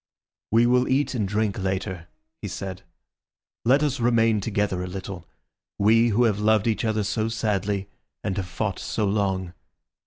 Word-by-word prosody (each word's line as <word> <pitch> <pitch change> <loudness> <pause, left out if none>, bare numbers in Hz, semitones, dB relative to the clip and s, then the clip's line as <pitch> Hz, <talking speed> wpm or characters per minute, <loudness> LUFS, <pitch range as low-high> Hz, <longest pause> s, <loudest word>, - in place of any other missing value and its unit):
"We 115 +2 +4
will 125 +1 +3
eat 135 +2 +1
and 110 -6 -1
drink 105 0 0
later," 95 -2 -3 0.3
he 105 - -4
said. 95 0 -6 0.8
"Let 135 +5 +4
us 140 -3 0
remain 115 -3 +3
together 100 -3 -1
a - - -4
little, 95 -1 -7 0.5
we 115 +3 +4
who 115 +3 +3
have 105 -4 +2
loved 110 -1 +3
each 115 -2 0
other 110 -2 0
so 110 +2 -1
sadly, 105 -3 -1 0.4
and 95 - -1
have 95 -2 -2
fought 95 +2 -3
so 110 - -1
long. 95 -3 0
105 Hz, 160 wpm, -25 LUFS, 95-115 Hz, 0.8 s, We